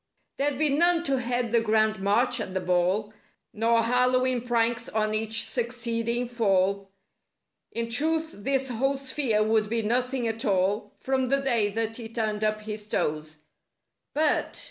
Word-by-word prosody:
64 285 +1 +2
There'd 290 +1 +1
be - - +2
none 340 +2 +3
to 275 -4 0
head 245 -1 -1
the 235 -1 +3
grand 215 -1 +2
march 235 +6 +2
at 185 - -5
the - - +1
ball;^ 185 +4 0 0.4
Noi 230 +2 +2
Hallow'en 250 +1 +2
pranks 235 -1 0
on 215 0 0
each 220 +1 +1
succeeding 235 0 -2
fall; 200 -4 +1 0.8
In 230 0 -3
truth 315 +7 +1
this 270 +5 -1
whole 270 +4 0
sphere 260 -5 0
would 215 -1 +1
be 230 0 -1
nothing 250 +2 0
at 225 +1 -3
all— 200 -1 0
From 265 -1 -1
the 275 +1 +2
day 235 -6 +1
that 225 0 -2
he 230 -2 -7
turned 220 -2 -2
up 215 0 0
his 210 -1 -6
toes. 155 -5 -2 0.7
But! 305 0 +1
230 Hz, 160 wpm, -26 LUFS, 215-255 Hz, 0.8 s, none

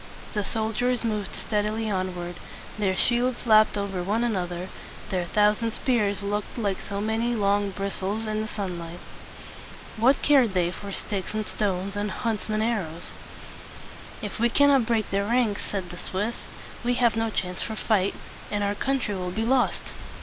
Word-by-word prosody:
The 210 - 0
soldiers 225 +4 0
moved 215 -3 -2
stead 210 -2 0
i 210 - 0
ly 220 0 -2
onward; 180 -2 -2 0.4
their 190 -2 +2
shields 245 +4 +1
lapped 215 -2 +6
over 200 -2 -2
one 210 +6 +1
another; 180 -5 -1 0.4
their 180 -2 0
thousand 210 +4 +2
spears 210 -6 +1
looked 205 +3 -2
like 200 -5 0
so 200 -1 -4
many 225 +3 0
long 205 -1 +2
bris 195 0 -3
tles 205 +4 -1
in 215 0 -1
the 220 - -3
sun 190 -5 -3
light. 170 +1 -7 1.0
What 250 +5 +4
cared 260 -9 +5
they 175 -1 +2
for 200 +2 -7
sticks 195 +1 -3
and 215 0 -1
stones 195 -1 -1
and 205 +1 -1
hunts 220 +1 -2
men's 215 0 +1
arrows? 180 -8 -2 1.1
"If 210 - -5
we 235 +1 +4
cannot 275 -2 +5
break 225 -3 +1
their 200 0 +1
ranks," 230 -2 +1
said 185 -4 -3
the 175 - -8
Swiss, 210 +5 -3 0.4
"we 245 +1 +2
have 235 -3 +3
no 225 0 +1
chance 180 -4 -2
for 220 - -3
fight, 205 -3 +1 0.3
and 205 0 0
our 200 0 +1
country 260 -1 0
will 180 -2 -3
be 220 +5 -1
lost!" 255 +1 +1
210 Hz, 175 wpm, -26 LUFS, 195-225 Hz, 1.1 s, lapped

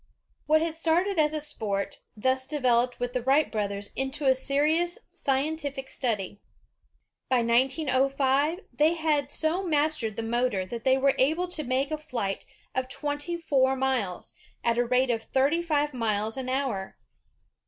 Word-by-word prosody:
What. 310 +1 +4
had 330 -1 -2
started 340 +3 +1
as 300 -1 +4
a - - 0
sport, 215 -10 -2 0.2
thus 260 +4 +1
developed 250 -4 +1
with 245 0 -2
the 250 - 0
Wright 275 +5 +3
brothers 200 -2 -3
into 270 +2 -3
a 265 - +6
serious 300 +6 +1
scientific 280 0 -2
study. 205 -5 -2 0.9
By 250 -2 +3
1905, 270 +5 +2
they 310 +3 +3
had 300 -4 0
so 315 +5 0
mastered 305 - 0
the 230 - -3
motor 230 -4 0
that 230 +4 -7
they 260 0 +5
were 270 0 +3
able 320 +7 +2
to 315 -3 -3
make 265 +3 0
a 310 - -2
flight 235 -10 -4 0.3
of 260 0 -2
twenty 290 +4 -3
four 265 -5 +2
miles, 255 -9 -1 0.3
at 235 0 +1
the 245 - +3
rate 250 +1 +2
of 225 -1 -1
thirty 275 +8 +1
five 295 -3 0
miles 220 -2 -1
an 260 -1 -4
hour. 255 -8 -2
265 Hz, 155 wpm, -27 LUFS, 240-300 Hz, 0.9 s, a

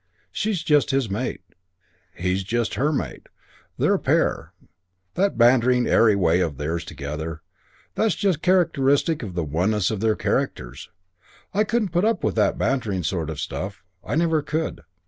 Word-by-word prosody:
She's 205 -6 -2
just 150 -3 +3
his 135 -6 0
mate. 110 -2 -3 0.7
He's 90 +2 -1
just 115 +4 -1
her 145 +4 +1
mate. 85 - -4 0.5
They're - - +2
a - - +1
pair. - - 0 0.6
That 195 - 0
bantering, 125 +1 +4
airy 110 -3 +4
way 90 -3 +2
of 80 -6 -1
theirs 80 +3 -2
together. 75 +3 -6 0.5
That's 220 -1 +1
just 190 -7 0
characteristic 160 -4 +2
of 100 -7 -7
the 85 - 0
oneness 90 +7 0
of 110 - -3
their 110 0 +2
characters. 65 +2 -3 0.6
I 205 +2 +3
couldn't 220 -2 0
put 175 +2 0
up 220 -3 +1
that - - +1
bantering 110 -9 -1
sort 80 -1 -2
of 75 -3 -5
stuff. 100 +7 -5 0.2
I - - -3
never 165 -1 +2
could. 155 - -3
115 Hz, 155 wpm, -23 LUFS, -, 0.7 s, bantering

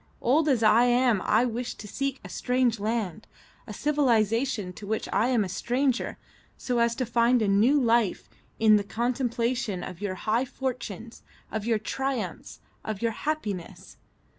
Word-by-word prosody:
Old 295 +5 +2
as 245 -5 +2
I 220 +3 +6
am 245 -4 +3
I 225 +3 +3
wished 245 0 -4
to 210 - -9
seek 275 +4 -3
a - - -5
strange 250 -3 0
land, 215 -2 -3 0.4
a - - -7
civilisation 230 -7 +1
to 200 - -10
which 220 +1 -2
I 225 - +3
am 245 -4 +2
a - - -3
stranger, 250 +7 -1 0.4
so 245 -2 -1
as 235 0 +2
to 255 - -1
find 235 +1 +3
a 215 - +1
new 220 +9 +4
life 230 -5 +1 0.3
in 215 -1 +6
the 205 - -1
contemplation 235 -2 -1
of 180 +1 -8
your 200 -2 -2
high 225 +6 0
fortunes, 240 -4 -5 0.3
of 220 0 -3
your 230 -2 +3
triumphs, 230 -3 -4 0.2
of 215 0 -5
your 230 - +2
happiness. 215 - -5
235 Hz, 165 wpm, -27 LUFS, 215-250 Hz, 0.4 s, I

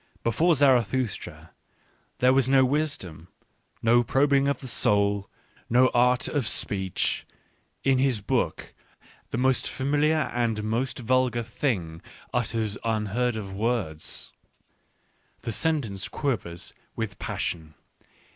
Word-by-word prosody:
Before 160 +9 +3
Zarathustra 130 -4 +1 0.7
there 130 +1 +4
was 130 -1 +2
no 135 -1 +5
wisdom, 125 - -3 0.6
no 120 +1 +5
probing 140 +3 +3
of 140 - 0
the 130 - -7
soul, 100 -3 +2 0.4
no 125 +2 +5
art 125 +1 +3
of 140 -7 -1
speech: 95 -4 0 0.6
in 135 -1 +3
his 130 -4 +2
book, 100 - -2 0.6
the - - -3
most 130 +1 +2
familiar 150 +3 +1
and 115 -3 0
most 115 +5 -1
vulgar 125 -1 +1
thing 100 - -2 0.3
utters 110 -3 -1
unheard 115 +2 0
of 100 -3 -5
words. 105 -8 -3 1.1
The 115 - -4
sentence 115 - 0
quivers 95 - -3 0.2
with 110 -5 -4
passion. 80 -3 -4
120 Hz, 110 wpm, -26 LUFS, 105-130 Hz, 1.1 s, no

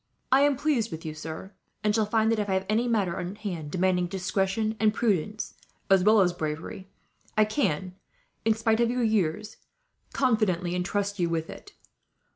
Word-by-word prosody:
I 265 +1 +6
am 285 -1 +4
pleased 260 -7 +1
with 160 0 -7
you, 155 - -4
sir; 160 +5 -7 0.3
and 210 0 +2
shall 215 -1 +2
feel 220 0 +2
that, 225 -1 +1
if 205 -1 -2
I 190 - +2
have 190 0 -1
any 225 +3 +1
matter 200 -7 0
on 180 +2 -4
hand 180 -8 -5
demanding 180 +1 +1
discretion 195 +4 -1
and 215 0 +3
prudence, 210 -2 -1 0.4
as 190 -2 +6
well 215 +1 +6
as 180 -2 +3
bravery, 160 +4 -5 0.5
I 215 - +6
can, 190 - -1 0.5
in 225 0 +3
spite 225 0 +1
of 235 -1 +3
your 245 0 0
years, 215 -1 0 0.5
confidently 215 -9 +1
intrust 200 +2 -1
you 170 -1 +1
with 165 -1 -2
it. - - -12
205 Hz, 180 wpm, -27 LUFS, 180-220 Hz, 0.5 s, I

